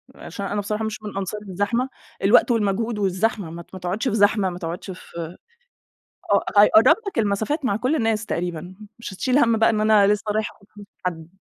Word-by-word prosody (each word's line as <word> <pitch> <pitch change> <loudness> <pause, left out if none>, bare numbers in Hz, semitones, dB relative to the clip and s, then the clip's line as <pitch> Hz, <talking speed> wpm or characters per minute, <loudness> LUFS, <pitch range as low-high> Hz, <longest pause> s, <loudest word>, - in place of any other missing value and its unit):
عشان 200 - -7
أنا 205 +1 -2
بصراحة 210 +2 -3
مش 215 0 -4
من 205 -2 -6
أنصار 195 +2 -4
الزحمة، 205 +7 -1 0.3
الوقت 230 +5 +5
والمجهود 220 0 0
والزحمة، 195 -1 0
ما 170 +1 -8
ت - - -17
ما 185 - -7
تقعدش 185 +8 -2
في 230 - 0
زحمة، 205 -2 +3
ما 175 - -7
تقعدش 175 +2 -6
في 170 -2 -8 1.0
آه - - +3 0.2
هيقرب 225 - +6
لك 320 - -5
المسافات 220 +8 0
مع 200 -6 +1
كل 255 +7 0
الناس 225 -3 0
تقريبًا، 175 -1 -4 0.2
مش 230 - -7
هتشيل 255 +7 +1
هَم 230 -5 +4
بقى 225 - +4
إن 215 - 0
أنا 215 -2 +5
لسه 210 +1 +1
رايح 215 0 -1
آخد 200 - -24
فلوس - - -16
من - - -50
حد. 160 -2 -4
205 Hz, 205 wpm, -23 LUFS, 185-225 Hz, 1.0 s, هيقرب